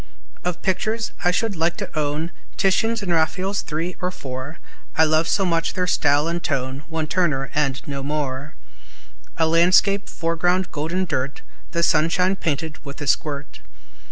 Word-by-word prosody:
Of 180 -1 -3
pictures, 220 +5 0
I 175 - +4
should 200 +3 0
like 165 +1 +1
to - - -6
own 155 +2 -1 0.3
Titians 225 +3 +2
and 180 -3 0
Raphaels 185 +5 +1
three 165 +4 -3
or 180 - +1
four, 135 -2 -6 0.4
I 160 - +7
love 155 +1 +3
so 195 - +2
much 165 -2 0
their 180 - +1
style 145 -3 +3
and 170 +1 -2
tone, 130 -1 -1
One 160 -1 -2
Turner, 155 -5 0
and 140 -2 +1
no 140 -1 -3
more, 145 0 -3 0.8
(A 160 - +3
landscape, 185 +5 +4
foreground 175 +2 0
golden 170 +5 -1
dirt, 135 -4 -2 0.3
The 170 0 0
sunshine 180 +4 +3
painted 160 -3 -3
with 140 -1 -8
a 145 - -4
squirt.) 145 +1 -1
165 Hz, 155 wpm, -23 LUFS, 145-180 Hz, 0.8 s, I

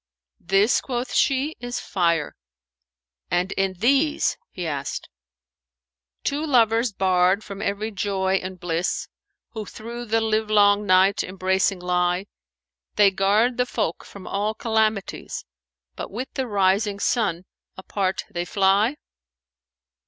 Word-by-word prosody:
'" - - -68
"This," 195 +6 +3
quoth 245 -1 -4
she, 280 +3 +2
"is 245 0 -4
Fire." 170 -5 0 0.9
"And 180 +2 0
in 195 -1 0
these;" 275 - +2
he 180 - -6
asked, 140 -3 -4 1.2
"Two 290 +2 -1
lovers 230 -5 +3
barred 185 +1 +2
from 200 -1 -8
every 215 +1 -2
joy 195 -1 0
and 185 0 -7
bliss, 170 0 -2 0.2
* - - -56
Who 220 -3 -5
through 235 +4 -8
the 225 0 +1
livelong 210 -2 +3
night 190 +1 +4
embracing 190 0 0
lie: 180 +1 0 0.7
They 205 -2 +6
guard 210 +6 +2
the 250 0 +1
folk 170 - -2
from 200 -2 -12
all 210 +2 -1
calamities, 220 -2 -1 0.2
* 65 -1 -60
But - - -6
with 245 +6 -5
the 265 -1 -2
rising 200 0 +1
sun 195 -7 0 0.3
apart 190 0 -2
they 175 0 -2
fly?" 200 +7 +2
200 Hz, 130 wpm, -23 LUFS, 185-225 Hz, 1.2 s, They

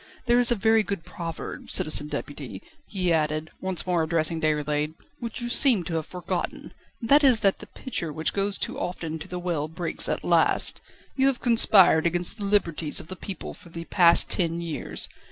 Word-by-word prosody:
There 240 0 +3
is 245 - +3
a 240 - +2
very 220 +1 +3
good 200 -5 -5
proverb, 165 -2 -7
Citizen 150 -1 +1
Deputy," 145 -3 -7 0.2
he 180 -4 0
added, 155 0 -1
once 190 -2 -1
more 180 -2 +1
addressing 160 0 -1
Déroulède, 150 0 -1 0.2
"which 235 -1 -6
you 240 - -3
seem 240 -5 +5
to 165 - -6
have 160 -1 -3
forgotten, 180 -1 -5 0.3
and 230 - -6
that 290 +1 +6
is 255 -5 +5
that 195 -1 +2
the - - -11
pitcher 200 - -5
which 155 +2 -2
goes 200 0 +1
too - - -4
often 165 -3 -4
to - - -9
the 180 - -6
well 170 -4 -2
breaks 165 +1 0
at - - -2
last. - - +2 0.3
You 265 0 +2
have 270 -3 0
conspired 195 -8 +5
against 175 +5 -1
the 205 - -4
liberties 170 -6 0
of - - -11
the 185 - -6
people 190 0 -7
for 175 - -16
the 165 0 -8
past 170 -2 +4
ten 170 -2 0
years. 170 -3 -5
175 Hz, 195 wpm, -25 LUFS, 160-205 Hz, 0.3 s, that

